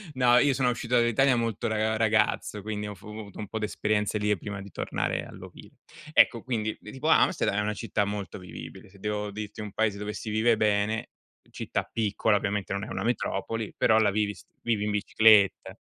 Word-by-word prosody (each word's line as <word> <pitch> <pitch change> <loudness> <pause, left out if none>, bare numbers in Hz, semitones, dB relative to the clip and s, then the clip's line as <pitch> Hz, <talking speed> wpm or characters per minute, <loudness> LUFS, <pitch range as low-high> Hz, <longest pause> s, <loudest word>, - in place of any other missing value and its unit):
No, 125 -1 +5
io 140 +2 +4
sono 130 -1 +1
uscito 125 0 -1
dall'Italia 120 +3 +4
molto 115 -1 -1
ra 110 0 0
ragazzo, 110 -1 +1
quindi 105 0 -4
ho 105 - -6
f 95 - -20
ho - - -10
avuto 100 -3 -10
un 105 - -5
po' 110 - -4
d'esperienze 105 0 0
lì, 105 -1 +1
prima 100 +2 -6
di 100 0 -11
tornare - - -2
all'ovile. - - -12 0.4
Ecco 115 -6 +5
quindi, 110 -4 -2
tipo 130 +8 -6
Amsterdam, 160 - +3
è - - +2
una 105 +1 -1
città 105 -1 -1
molto 100 -1 -5
vivibile. 90 +1 -10
Se 100 +1 -19
devo 105 0 -3
dirti 105 +1 -7
un 105 -1 -6
paese 105 -1 0
dove 105 +1 -4
si 110 - -6
vive 110 +2 +3
bene, 105 +1 +1 0.4
città - - -3
piccola 110 -1 +1
ovviamente, 100 -1 -2
non 100 0 -3
è - - -5
una - - -3
metropoli, 115 -1 -2
però 110 - +4
la 105 -2 +3
vivi 105 0 0
s - - -16 0.2
vivi 110 -3 0
in 105 - -1
bicicletta. 105 0 +4
105 Hz, 200 wpm, -27 LUFS, 105-115 Hz, 0.4 s, No